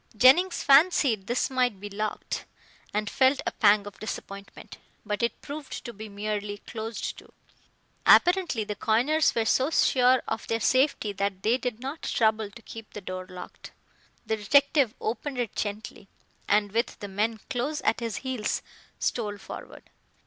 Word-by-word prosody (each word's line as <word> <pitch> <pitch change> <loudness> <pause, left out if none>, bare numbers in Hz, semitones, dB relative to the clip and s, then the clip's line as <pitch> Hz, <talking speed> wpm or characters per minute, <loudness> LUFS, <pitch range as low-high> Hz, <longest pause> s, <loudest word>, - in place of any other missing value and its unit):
Jennings 335 - +5
fancied 275 - +4
this 245 +2 0
might 250 -6 +1
be 205 - -6
locked, 210 +1 -4 0.5
and 210 0 -1
felt 265 +5 +3
a - - 0
pang 205 -1 +4
of 205 - -10
disappointment. 200 -2 -8 0.3
But 210 -1 -2
it 235 - -2
proved 295 -1 -7
to 235 - -6
be 215 +1 -9
merely 205 0 -3
closed 220 +2 -5
to. - - -18 0.8
Apparently 355 - +5
the 210 - -4
coiners 250 +10 +2
were 225 -1 +1
so 260 +5 +2
sure 255 -4 +4
of 225 0 -3
their 225 - 0
safety 255 -4 +2
that 200 -1 -2
they 235 +4 +2
did 245 -3 -4
not 275 +5 -5
trouble 220 -2 +1
to 230 +3 -14
keep 225 -1 -10
the 210 - -7
door 185 0 -6
locked. 180 0 -10 0.5
The 220 - -1
detective 280 +3 +3
opened 255 +5 -3
it 240 -4 -2
gently, 205 -1 -5 0.4
and 205 0 +3
with 230 +3 -1
the 205 - -7
men 215 +3 -1
close 290 +4 -1
at - - +1
his 230 -4 -3
heels 255 -5 -2 0.3
stole 210 -4 -2
forward. 195 - -10
225 Hz, 160 wpm, -27 LUFS, 205-260 Hz, 0.8 s, Jennings